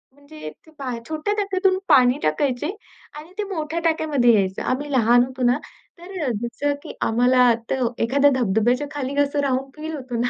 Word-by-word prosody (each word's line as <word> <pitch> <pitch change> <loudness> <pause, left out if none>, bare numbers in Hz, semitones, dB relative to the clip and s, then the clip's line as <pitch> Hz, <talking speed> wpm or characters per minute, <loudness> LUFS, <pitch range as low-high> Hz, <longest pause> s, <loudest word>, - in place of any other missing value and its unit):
म्हणजे 285 - -10 0.6
छोट्या 315 +7 -2
टाक्यातून 385 -2 +1
पाणी 260 -3 +5
टाकायचे 250 - 0 0.5
आणि 315 +4 -11
ते 420 - -1
मोठ्या 315 0 -3
टाक्यामध्ये 300 -7 +3
यायचं. 190 -3 0
आम्ही 285 +3 -2
लहान 245 -1 +4
होतो 260 0 -6
ना, 245 +3 +3 0.4
तर 370 +2 -8
अ, 260 - 0
जसं 285 +5 -1
की - - -8
आम्हाला 245 +1 +4 0.2
तर 260 -2 0 0.2
एखाद्या 280 +4 +3
धबधब्याच्या 240 +4 +1
खाली 280 -2 -4
कसं 285 0 +1
राहून 265 0 -1
फील 315 +1 -6
होतो 255 -4 -5
ना, 245 - 0
270 Hz, 165 wpm, -22 LUFS, 245-305 Hz, 0.6 s, पाणी